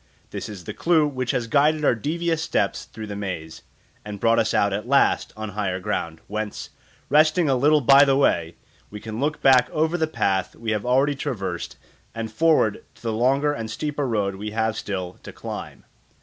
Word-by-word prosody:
This - - -5
is 100 -4 -9
the - - -6
clue 165 -3 +3
which 130 -3 -4
has 120 - 0
guided 150 +5 +2
our - - +5
devious 165 +7 -1
steps - - -1
through 110 0 -9
the 105 -1 -6
maze, 90 -6 -6 0.4
and 105 -1 -7
brought 115 +2 +3
us 110 - +1
out 100 -1 +2
at 105 +4 -3
last 140 +1 +2
on 110 0 -5
higher 95 -2 -2
ground, 85 -5 -3
whence, 105 0 -5 0.4
resting 155 +3 +4
a 135 - +3
little 150 +4 +4
by 140 +2 +7
the 135 -1 +3
way, 85 - +1 0.3
we 105 - -8
can 110 +1 -6
look 150 +3 -2
back 130 -2 +5
over 160 +3 0
the 160 - +1
path 95 -11 -1
we 115 -1 -4
have 105 +2 -2
already 135 +3 +3
traversed 100 - -4 0.4
and 115 -1 -4
forward 155 -6 +2
to - - -21
the 115 -1 -1
longer 135 +6 +2
and 115 -5 -5
steeper 145 0 -3
road 100 -4 -1
we 105 +2 -5
have 110 0 -1
still 95 -4 -5
to - - -9
climb. - - -8
115 Hz, 195 wpm, -23 LUFS, 105-145 Hz, 0.4 s, by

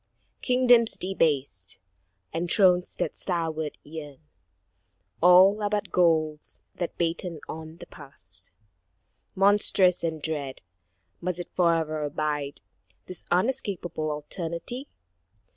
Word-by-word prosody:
Kingdoms 245 -2 +4
debased, 140 - -1 0.6
and 170 +2 -2
thrones 180 -3 +3
that - - -2
starward 160 -4 -2
yearn, 150 -2 -9 1.0
All 185 +4 +7
are 205 - 0
but 210 0 -2
ghouls 155 -3 +1
that 175 - -5
batten 170 -1 -2
on 160 +1 -8
the - - -10
past. 140 -2 -10 0.9
Monstrous 195 -2 +4
and 160 -1 -2
dread, 145 -6 -4 0.6
must 180 0 -2
it 175 - -7
fore'er 160 -3 +1
abide, 145 -1 -3 0.4
This 185 - -9
unescapable 180 -6 -1
alternity? 170 - -4
170 Hz, 100 wpm, -26 LUFS, 155-185 Hz, 1.0 s, All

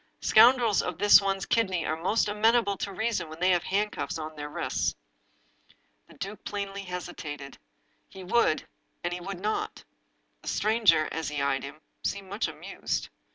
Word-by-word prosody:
Scoundrels 235 -2 +6
of 180 -2 -4
this 205 +2 +7
one's 195 -1 -1
kidney 190 -7 +1
are 155 - 0
most 185 +7 +1
amenable 210 0 +3
to 200 - -4
reason 220 -4 -2
when 160 +1 -10
they 180 +1 +3
have 175 -1 +3
hand 210 +2 0
cuffs 145 +1 -4
on 155 0 -6
their 150 0 -6
wrists." - - -1 1.1
The - - -17
duke 200 +2 -7
plainly 200 -1 -4
hesitated. 150 -6 -7 0.5
He 190 - -10
would 180 -4 +2 0.2
— - - -45
and 175 0 -1
he 180 - -5
would 190 0 -6
not. 210 +3 -2 0.6
The - - -14
stranger, 210 -8 +3
as 160 -2 -3
he 150 -1 -3
eyed 140 -1 +1
him, 140 +3 -9 0.2
seemed 195 -1 -3
much 205 +4 0
amused. - - -4
190 Hz, 170 wpm, -28 LUFS, 160-210 Hz, 1.1 s, this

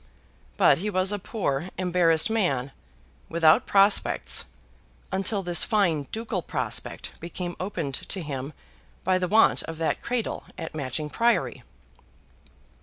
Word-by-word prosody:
But 135 - +5
he 210 +4 -2
was 185 0 +1
a 205 - -2
poor, 180 - -2
embarrassed 175 -3 +3
man, 145 - 0 0.6
without 165 -1 +4
prospects, 200 +1 +3 0.7
until 195 +1 -1
this 175 -1 +2
fine 175 - +1
ducal 225 +1 -3
prospect - - -3
became 175 +1 -5
opened 175 -7 -3 0.2
to 190 - -1
him 140 -1 -5 0.5
by 185 0 +2
the 180 - 0
want 175 - +4
of 165 - -7
that 165 0 -1
cradle 240 -2 -3
at 165 - -6
Matching 150 +1 -3
Priory. 235 0 +1
180 Hz, 125 wpm, -26 LUFS, 155-200 Hz, 0.7 s, But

